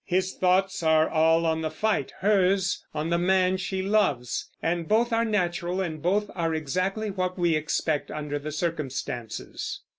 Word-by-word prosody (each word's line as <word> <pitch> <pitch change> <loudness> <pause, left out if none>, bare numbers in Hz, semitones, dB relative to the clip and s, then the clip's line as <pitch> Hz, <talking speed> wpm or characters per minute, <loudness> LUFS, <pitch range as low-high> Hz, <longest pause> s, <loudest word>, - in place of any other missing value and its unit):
His 185 +1 0
thoughts 185 +1 +1
are 160 -1 +4
all 165 +1 +3
on 160 0 +1
the 160 - -1
fight; 210 +7 -1
hers 195 -2 +2
on 155 +2 -3
the 170 - +2
man 185 +1 +3
she 190 0 -3
loves; 195 - 0
and 165 0 -1
both 230 +2 +2
are 225 0 +3
natural, 180 -4 -1
and 160 -5 -3
both 200 +5 +1
are 165 -3 -1
exactly 185 +8 -1
what 185 -1 -2
we 170 -2 +2
expect 155 0 -1
under 145 -1 -4
the 155 +2 -5
circumstances. 140 -8 -4
175 Hz, 160 wpm, -26 LUFS, 160-190 Hz, -, are